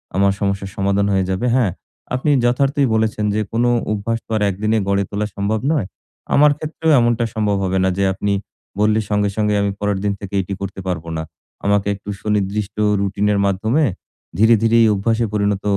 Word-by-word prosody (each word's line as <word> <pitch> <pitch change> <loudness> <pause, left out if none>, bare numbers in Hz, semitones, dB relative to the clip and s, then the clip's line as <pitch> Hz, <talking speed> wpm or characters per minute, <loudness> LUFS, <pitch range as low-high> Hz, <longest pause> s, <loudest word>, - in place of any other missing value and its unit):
আমার 100 +1 +3
সমস্যার 100 -1 -1
সমাধান 100 0 +1
হয়ে 95 -1 +2
যাবে। 95 +6 -1
হ্যাঁ, 120 -8 +2 0.4
আপনি 130 +4 -1
যথার্থই 135 +3 +2
বলেছেন 110 -1 0
যে 110 - +1
কোন 115 +1 +1 0.3
অভ্যাস 110 +2 -1
তো - - -13
আর - - -3
একদিনে 105 +3 0
গড়ে 100 0 +2
তোলা 105 +1 -2
সম্ভব 100 +2 -1
নয়। 150 -11 +1 0.5
আমার 150 +1 +6
ক্ষেত্রেও 160 +1 -1
এমনটা 120 0 +2
সম্ভব 105 -2 +1
হবে 95 0 0
না 95 - +3
যে 100 - +1
আপনি 100 +1 -1 0.5
বললে 105 +1 +3
সঙ্গে, 105 -1 +1
সঙ্গে 105 -1 +1
আমি 100 0 0
পরের 105 -1 0
দিন 100 -1 +1
থেকে 100 0 -9
এটি 95 +1 -5
করতে 100 0 -5
পারব 90 -3 -2
না। 80 - -3 0.4
আমাকে 100 0 +2
একটু 100 +1 -10
সুনির্দিষ্ট 105 0 -1 0.3
রুটিনের 100 +1 0
মাধ্যমে 110 +10 +1 0.5
ধীরে, 110 +3 +6
ধীরে 115 0 +3
এই - - +5
অভ্যাসে 115 +3 0
পরিণত 100 -1 0
105 Hz, 185 wpm, -19 LUFS, 100-110 Hz, 0.5 s, আমার